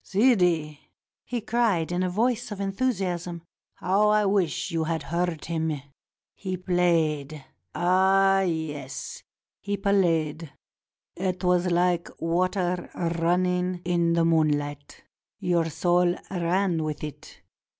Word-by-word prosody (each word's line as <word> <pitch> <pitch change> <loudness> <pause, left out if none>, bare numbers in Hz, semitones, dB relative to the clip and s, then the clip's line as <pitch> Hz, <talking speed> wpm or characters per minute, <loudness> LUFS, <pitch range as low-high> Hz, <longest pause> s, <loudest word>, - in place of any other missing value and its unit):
" - - -42
Sidi," 180 - +2 0.5
he 240 -1 -3
cried 220 -8 +1
in 175 +1 0
a 185 - 0
voice 230 +4 0
of 205 - -5
enthusiasm, 190 -5 -2 0.3
"how 200 +3 +2
I 210 0 +3
wish 195 -3 0
you 165 -1 0
had 160 0 -2
heard 170 -1 -2
him. 160 -3 -2 0.5
He 185 -2 -4
played! 160 -5 0 0.3
Ah, 190 +2 +4
yes, 155 -7 -4 0.4
he 205 0 -3
played! 165 -6 +1 0.6
It 185 0 -2
was 180 0 +2
like 175 0 +1
water 180 +1 0
running 180 +1 0
in 170 -1 +2
moonHght. 150 -3 0 0.4
Your 175 -4 0
soul 175 +2 +2 0.2
ran 175 -1 0
with 150 -1 -4
it. 150 -3 -9
175 Hz, 115 wpm, -26 LUFS, 165-190 Hz, 0.6 s, Ah